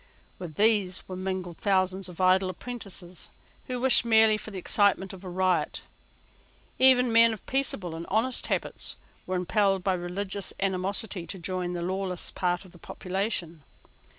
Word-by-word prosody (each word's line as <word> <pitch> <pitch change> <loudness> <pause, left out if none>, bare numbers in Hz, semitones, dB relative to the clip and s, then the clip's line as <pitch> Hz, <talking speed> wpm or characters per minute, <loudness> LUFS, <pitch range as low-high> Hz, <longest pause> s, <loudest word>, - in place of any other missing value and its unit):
With 170 -4 -7
these 205 -3 +2
were 185 - -6
mingled 185 -2 -4
thousands 190 -1 +1
of 180 - -12
idle 185 0 +4
apprentices, 190 -4 -6 0.4
who 250 -2 -3
wished 260 0 +4
merely 220 -2 +5
for 215 - -7
the 200 - -7
excitement 195 +1 +2
of 190 0 -11
a 185 - -6
riot. 185 0 0 1.0
Even 255 -2 +6
men 230 0 +7
of 215 - -10
peaceable 245 -10 -1
and 165 +1 -7
honest 230 +5 +1
habits - - -3 0.3
were 185 - -1
impelled 195 +1 +1
by 190 - +2
religious 190 +2 -3
animosity 190 -1 -1
to 195 - -6
join 180 0 -3
the 175 -1 -3
lawless 185 0 -2
part 180 +1 -1
of 185 - -15
the 175 - -17
population. 185 -3 -3
190 Hz, 155 wpm, -27 LUFS, 180-210 Hz, 1.0 s, men